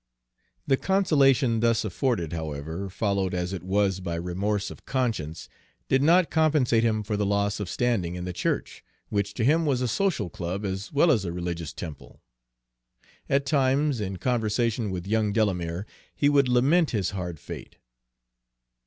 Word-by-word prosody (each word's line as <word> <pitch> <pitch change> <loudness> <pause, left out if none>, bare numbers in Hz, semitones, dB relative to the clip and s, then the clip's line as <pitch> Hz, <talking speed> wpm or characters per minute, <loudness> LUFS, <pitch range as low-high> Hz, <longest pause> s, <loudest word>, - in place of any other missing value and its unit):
The 135 -2 +3
consolation 140 - +3
thus 115 -1 +2
afforded, 95 - -1
however, 80 +4 -4
followed 100 -1 -1
as 90 +1 -2
it 95 - -4
was 95 0 +1
by 85 -2 -3
remorse 100 +4 -2
of - - -12
conscience, 110 - -2 0.4
did 135 - +3
not 170 +4 +4
compensate 150 -7 +3
him 110 -2 +1
for 105 +1 -2
the 105 - 0
loss 100 0 0
of 100 -4 -4
standing 105 -9 0
in 90 - -5
the 90 - -4
church, - - -2 0.3
which 100 0 -1
to 115 - -1
him 155 +7 +4
was 140 -5 +1
a 125 - 0
social 155 - 0
club 90 +6 -4
as 95 +1 -4
well 155 +3 +4
as 115 -9 +2
a 85 - -3
religious 85 -2 -4
temple. 80 -6 -9 1.1
At 140 0 +2
times, 135 -2 +2
in 95 -2 -3
conversation 115 -1 0
with 90 -2 -4
young 105 0 +1
Delamere, 90 -4 0 0.3
he 145 - +3
would 140 -2 +4
lament 140 +7 +3
his 100 -5 -1
hard 90 -5 -5
fate. - - -9
105 Hz, 160 wpm, -26 LUFS, 90-130 Hz, 1.1 s, not